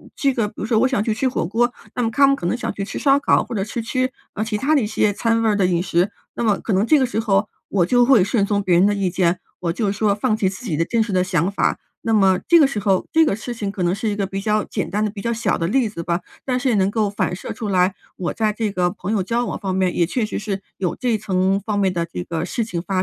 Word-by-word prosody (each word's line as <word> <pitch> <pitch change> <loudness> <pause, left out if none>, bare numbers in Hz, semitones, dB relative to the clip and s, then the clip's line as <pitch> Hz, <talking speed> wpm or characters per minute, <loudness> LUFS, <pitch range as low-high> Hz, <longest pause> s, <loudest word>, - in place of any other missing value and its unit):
这 275 -2 +1
个， 230 -4 0
比 - - -22
如 - - -3
说 225 -1 +2
我 260 - +4
想 260 -5 0
去 220 - 0
吃 240 +5 0
火 250 - -2
锅， 240 +6 +1 0.2
那 245 - 0
么 225 - +1
他 275 +5 +5
们 275 - +4
可 225 - -7
能 175 - +1
想 - - -3
去 200 - -4
吃 - - -6
烧 275 -1 +4
烤， - - +3
或 245 - -7
者 195 - 0
去 230 +3 -4
吃， 255 +3 -1 0.2
呃， 215 - -2
其 220 -1 -2
它 275 +8 +1
的 280 - +3
一 210 - -1
些 210 -1 +1
餐 230 +2 +1
味 - - +2
儿 210 - +2
的 195 -2 +2
饮 175 -1 +1
食。 180 +1 +1 0.3
那 - - -2
么 210 -3 +2
可 225 - -4
能 190 +3 +2
这 305 +6 +5
个 265 - +3
时 240 -3 -2
候 205 -2 +1 0.2
我 185 -4 +2
就 245 +6 +4
会 240 -7 +5
顺 205 +1 +1
从 200 0 0
别 185 -2 +3
人 180 +3 +5
的 205 - +3
意 195 -2 0
见， 180 0 +1 0.2
我 170 -2 -1
就 205 +1 0
说 205 0 +1
放 215 0 0
弃 200 - +1
自 190 +5 -5
己 160 -8 -2
的 165 - +1
真 230 +5 +1
实 190 -4 0
想 180 0 0
法。 - - 0 0.3
那 225 - 0
么 190 -3 +4
这 340 - +7
个 295 - +7
时 270 -6 -1
候 195 -2 +1
这 320 - +5
个 200 - +1
事 225 +3 -6
情 210 -4 -4
可 185 -3 -3
能 175 - +2
是 215 +3 -3
一 205 - -1
个 200 - -1
比 195 +1 -4
较 215 0 +1
简 200 - -4
单 210 +3 -1
的、 210 - -2
比 200 -1 -8
较 235 - -1
小 225 - 0
的 165 - -1
例 250 +4 +2
子 170 -5 -6
吧， 170 +1 -1 0.2
但 255 -2 0
是 260 - 0
也 235 - +2
能 195 -1 +2
够 210 -1 0
反 190 -3 -1
射 185 - -7
出 220 - -5
来， 185 0 +2 0.2
我 180 - -3
在 215 -1 +1
这 215 -1 -2
个 180 -2 +1
朋 180 +2 -5
友 210 -3 +1
交 235 +5 -1
往 - - -4
方 190 -3 -2
面， 185 -1 +1
也 170 - +3
确 220 +6 -1
实 215 - -4
是 195 -2 -4 0.2
有 180 -3 -2
这 245 -4 0
层 195 -1 +1
方 210 -2 -1
面 195 -2 +2
的 170 -1 -1
这 90 - -5
个 160 - -3
情 215 -5 -3
况 185 +1 -2
205 Hz, 335 characters per minute, -21 LUFS, 185-230 Hz, 0.3 s, 这